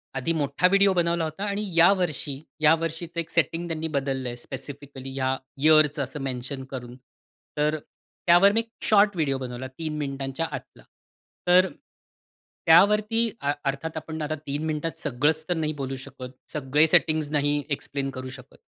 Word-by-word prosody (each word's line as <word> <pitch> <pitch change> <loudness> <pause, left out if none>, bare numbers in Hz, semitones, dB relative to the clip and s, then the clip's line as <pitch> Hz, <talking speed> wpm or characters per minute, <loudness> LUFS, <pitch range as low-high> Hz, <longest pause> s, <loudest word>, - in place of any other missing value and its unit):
आधी 135 +5 0
मोठा 145 +5 +2
व्हिडिओ 200 +1 +5
बनवला 170 -1 +1
होता 160 +5 -4
आणि 200 0 -2
या 170 +3 +7
वर्षी, 155 -5 -2 0.3
या 155 0 +7
वर्षीचं 165 +1 -4
एक 165 -1 -4
सेटिंग 165 +1 0
त्यांनी 160 -1 -3
बदललंय 135 -3 -2
स्पेसिफिकली 135 +1 -8
ह्या 130 -1 0 0.3
यिअरचं 155 -1 +5
असं 135 +3 -6
मेन्शन 130 +1 -4
करून. 125 -2 -7 0.6
तर 150 +1 +1 0.5
त्यावर 175 +4 +7
मी 220 - +2
एक 230 0 -4 0.2
शॉर्ट 205 -2 +5
व्हिडिओ 145 -5 0
बनवला 130 0 -5
3 155 +3 -5
मिनिटांच्या 140 +1 -3
आतला. - - -8 0.6
तर 180 +1 +6 1.0
त्यावरती, 210 +7 +5 0.3
अर्थात 140 +4 -3
आपण 160 0 -5
आता 155 +1 -2
3 145 0 -5
मिनिटात 155 +1 -2
सगळंच 150 +3 0
तर - - +3
नाही 155 -1 -1
बोलू 135 0 -3
शकत. 130 -2 -9 0.2
सगळे 150 +1 +3
सेटिंग्स 155 -2 +3
नाही 145 -1 +1
एक्सप्लेन 140 -1 -2
करू 130 -1 -6
शकत. 130 - -12
150 Hz, 155 wpm, -25 LUFS, 135-170 Hz, 1.0 s, या